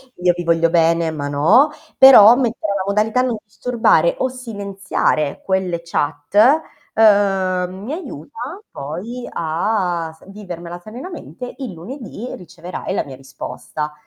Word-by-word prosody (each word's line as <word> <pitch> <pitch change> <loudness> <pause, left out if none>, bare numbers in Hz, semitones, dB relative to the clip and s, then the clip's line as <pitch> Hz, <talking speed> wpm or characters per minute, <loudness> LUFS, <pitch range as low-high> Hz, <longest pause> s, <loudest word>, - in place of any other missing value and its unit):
io 180 0 +2
vi 175 - -4
voglio 165 0 +2
bene, 165 0 +2
ma 145 -2 -4
no! 165 - +4 0.3
Però 240 -4 +9
mettere 230 -5 -1
la 190 - -1
modalità 215 +4 +1
non 245 -3 -1
disturbare 245 - +2
o - - +1
silenziare 200 - -2
quelle 190 -3 -1
chat, 145 -2 -3 0.6
uhm, 190 -4 +2
mi 275 - -4
aiuta, 300 - -7
poi 190 - -6
a 170 0 -1
s - - -17
vivermela 175 -4 -8
serenamente, 250 - -9
il 260 -6 -5
lunedì 225 - -8
riceverai 180 +1 -7
la - - -1
mia 135 -2 -9
risposta. 135 +3 -6
190 Hz, 130 wpm, -19 LUFS, 170-235 Hz, 0.6 s, Però